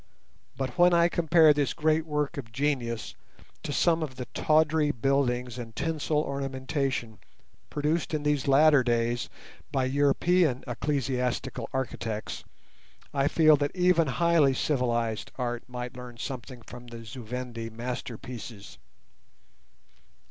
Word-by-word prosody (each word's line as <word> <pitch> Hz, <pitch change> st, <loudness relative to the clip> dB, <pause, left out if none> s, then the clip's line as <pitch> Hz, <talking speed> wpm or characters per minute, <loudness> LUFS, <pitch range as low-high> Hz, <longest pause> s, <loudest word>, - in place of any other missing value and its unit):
But 135 Hz, +4 st, -4 dB
when 175 Hz, 0 st, +6 dB
I 170 Hz, 0 st, +5 dB
compare 165 Hz, -2 st, +5 dB
this 145 Hz, -1 st, 0 dB
great 155 Hz, 0 st, +1 dB
work 150 Hz, +1 st, -1 dB
of 115 Hz, -5 st, -7 dB
genius 120 Hz, -3 st, -2 dB, 0.5 s
to -, -, -4 dB
some 165 Hz, +2 st, +2 dB
of 145 Hz, -5 st, -4 dB
the 125 Hz, -1 st, -5 dB
tawdry 155 Hz, -1 st, +3 dB
buildings 125 Hz, -2 st, 0 dB
and 115 Hz, -2 st, -8 dB
tinsel 155 Hz, -1 st, 0 dB
ornamentation 135 Hz, -4 st, -3 dB, 0.5 s
produced 150 Hz, +3 st, -1 dB
in 155 Hz, -2 st, -2 dB
these 150 Hz, -3 st, 0 dB
latter 145 Hz, +1 st, +6 dB
days 120 Hz, 0 st, 0 dB, 0.4 s
by 135 Hz, -2 st, +1 dB
European 145 Hz, +2 st, +2 dB
ecclesiastical 125 Hz, -1 st, -2 dB
architects, 115 Hz, -4 st, -4 dB, 0.7 s
I 140 Hz, 0 st, +2 dB
feel 155 Hz, 0 st, +5 dB
that 145 Hz, +4 st, -2 dB
even 180 Hz, -3 st, +3 dB
highly 145 Hz, 0 st, +3 dB
civilized 120 Hz, -6 st, -1 dB
art 120 Hz, -2 st, -3 dB
might 125 Hz, 0 st, -6 dB
learn 125 Hz, -1 st, -9 dB
something 125 Hz, -1 st, -7 dB
from 120 Hz, +2 st, -11 dB
the 115 Hz, -1 st, -9 dB
Zu 120 Hz, +3 st, -8 dB
Vendi 120 Hz, -1 st, -5 dB
masterpieces. 115 Hz, -2 st, -7 dB
135 Hz, 125 wpm, -28 LUFS, 120-150 Hz, 0.7 s, when